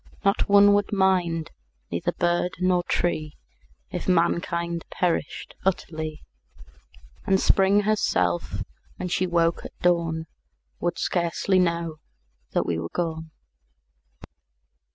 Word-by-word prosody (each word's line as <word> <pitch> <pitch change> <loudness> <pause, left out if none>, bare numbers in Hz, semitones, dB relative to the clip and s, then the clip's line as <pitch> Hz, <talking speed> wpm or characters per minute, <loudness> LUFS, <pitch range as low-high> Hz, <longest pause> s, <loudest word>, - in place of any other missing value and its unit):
Not 200 +1 +2
one 200 0 +7
would 205 0 +1
mind, 180 -5 +1 0.4
neither 85 - -1
bird 175 +1 0
nor 180 -1 +2
tree 155 -3 -1 0.5
If - - -4
mankind 170 -1 +1
perished 170 -4 -2
utterly; 160 -4 -2 1.0
And 190 0 +4
Spring 195 +2 +4
herself, 145 - 0 0.3
when 180 - -4
she 185 +1 0
woke 170 -1 +1
at - - -10
dawn, 165 -2 +1 0.5
Would 175 0 -1
scarcely 175 +2 +1
know 170 -2 0 0.6
that - - +1
we 85 -1 -1
were 85 0 -4
gone. 160 -2 -3
175 Hz, 110 wpm, -25 LUFS, 165-185 Hz, 1.0 s, one